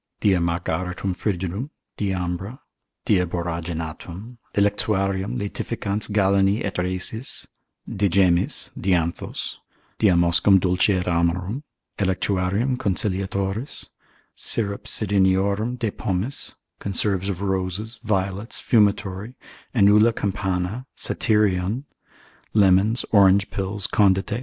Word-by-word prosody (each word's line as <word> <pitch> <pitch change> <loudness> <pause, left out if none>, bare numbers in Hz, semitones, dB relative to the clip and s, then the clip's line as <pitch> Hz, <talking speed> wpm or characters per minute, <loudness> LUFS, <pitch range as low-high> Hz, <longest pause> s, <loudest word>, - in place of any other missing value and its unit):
Diamargaritum 90 0 0
frigidum, 95 - -2 0.3
diambra, 95 +3 -3 0.5
diaboraginatum, 85 +3 -2 0.2
electuarium 100 +1 +1
laetificans 105 0 -2
Galeni 100 +1 +3
et 100 - -3
Rhasis, 95 +7 -3 0.4
de 100 0 0
gemmis, 90 -1 +2
dianthos, 85 -2 -1 0.4
diamoscum 90 0 +4
dulce 90 +2 +2
et 95 -3 +1
amarum, 90 +7 0 0.4
electuarium 100 +5 0
conciliatoris, 100 - -2 0.4
syrup. 100 -3 -3
Cidoniorum 100 +3 +2
de 115 -4 -1
pomis, 95 +10 -2 0.2
conserves 100 -1 -1
of 100 0 -3
roses, 95 +4 -2
violets, 100 +1 -2
fumitory, 105 0 +1 0.4
enula 105 +1 +5
campana, 95 +4 -2
satyrion, 105 +2 +1 0.7
lemons, 100 +3 +4
orange 100 -1 +5
pills, 100 0 -2
condite, 95 -1 +3
&c. 105 +2 -1
100 Hz, 85 wpm, -23 LUFS, 90-105 Hz, 0.7 s, enula